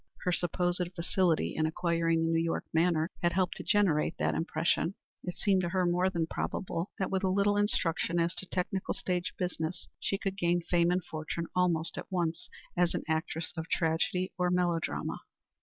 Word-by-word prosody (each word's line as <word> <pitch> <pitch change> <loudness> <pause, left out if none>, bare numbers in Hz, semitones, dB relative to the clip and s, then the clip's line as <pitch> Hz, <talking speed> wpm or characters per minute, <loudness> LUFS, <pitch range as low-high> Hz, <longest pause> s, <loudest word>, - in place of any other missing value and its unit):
Her 180 - +1
supposed 175 0 0
facility 170 -1 +1
in 155 0 +2
acquiring 165 0 +1
the 165 - +1
New 165 0 +2
York 165 - -1
manner 165 0 +2
had 175 -1 +2
helped 185 -1 +1
to - - -6
generate 185 -8 +2
that - - +1
impression. 165 +3 0 0.3
It 180 - -4
seemed 195 -3 +3
to 175 - -1
her 185 0 +1
more 180 +2 +2
than 170 -3 0
probable 170 +2 -3
that 190 - -1
with 190 0 0
a 190 - +3
little 200 +2 +3
instruction 175 -4 +1
as 170 0 +1
to 190 - -2
technical 185 +1 -2
stage 180 -1 -2
business 175 -2 -3
she 195 - -1
could 195 0 -3
gain 175 0 +2
fame 170 0 +3
and 180 0 +1
fortune 155 +2 -4
almost 170 -3 +2
at - - -9
once 170 -2 -1 0.3
as 175 -1 +3
an - - -2
actress 160 +1 -1
of 160 -1 -5
tragedy 170 +2 +1
or 180 0 +3
melodrama. 175 -2 0
175 Hz, 185 wpm, -31 LUFS, 165-185 Hz, 0.3 s, seemed